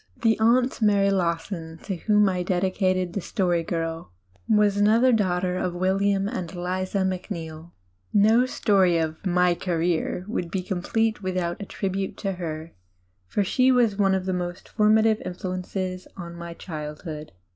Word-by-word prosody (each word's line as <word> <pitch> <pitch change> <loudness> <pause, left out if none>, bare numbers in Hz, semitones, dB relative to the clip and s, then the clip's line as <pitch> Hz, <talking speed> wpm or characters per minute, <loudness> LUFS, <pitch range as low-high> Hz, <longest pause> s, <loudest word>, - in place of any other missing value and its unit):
The 225 -1 +4
"Aunt 245 +3 +3
Mary 200 -2 +4
Lawson," 170 -2 -2
to 195 - -3
whom 210 +3 +3
I 185 -2 0
dedicated 185 0 0
The 200 - -2
Story 175 -1 0
Girl, 165 - -4 0.4
was 210 -2 +4
another 225 +5 +4
daughter 180 -4 +1
of 180 -1 -2
William 195 +2 +1
and 185 -7 -4
Eliza 185 +2 -2
Mac 185 +1 -3
neill. 165 -3 -7 0.4
No 220 +5 +4
story 190 -8 +3
of 160 -1 -2
my 180 -1 +3
"career" 175 0 -1
would 180 -5 -3
be 185 +1 -2
complete 215 +4 -1
without 185 -1 -2
a 200 - -6
tribute 195 -1 -3
to 195 - -2
her, 165 -3 -6 0.5
for 205 - 0
she 255 +6 +3
was 240 -5 +3
one 195 -1 +3
of 185 -1 -2
the 180 -1 -3
formative 220 0 +4
influences 185 0 -4
of 170 -2 -7
my 170 0 -8
childhood. 150 - -7
185 Hz, 150 wpm, -25 LUFS, 175-205 Hz, 0.5 s, The